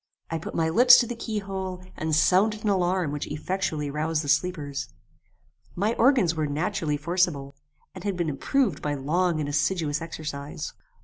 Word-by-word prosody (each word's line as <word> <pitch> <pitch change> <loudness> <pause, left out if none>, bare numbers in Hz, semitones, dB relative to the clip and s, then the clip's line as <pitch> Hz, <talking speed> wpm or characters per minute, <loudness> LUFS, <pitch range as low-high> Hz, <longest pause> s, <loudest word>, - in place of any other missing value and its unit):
I 165 - -1
put - - -7
my 165 -1 +1
lips 245 +10 +8
to - - +3
the 240 - -5
key 225 -2 -4
hole, 190 -2 -4
and 155 -1 -1
sounded 200 +7 +3
an 210 - +2
alarm 180 -4 +1
which 145 0 -4
effectually 155 -2 -2
roused 155 +1 -1
the 145 - -5
sleepers. 150 -2 -1 0.9
My 205 +5 +1
organs 235 - +3
were 155 -2 -1
naturally 155 0 -1
forcible, 155 -3 0 0.4
and - - -9
had 200 -3 -2
been 170 -2 0
improved 245 - 0
by 145 -1 -1
long 165 +4 0
and 150 - -2
assiduous 150 +1 0
exercise. 150 -3 -6
165 Hz, 170 wpm, -26 LUFS, 150-190 Hz, 0.9 s, lips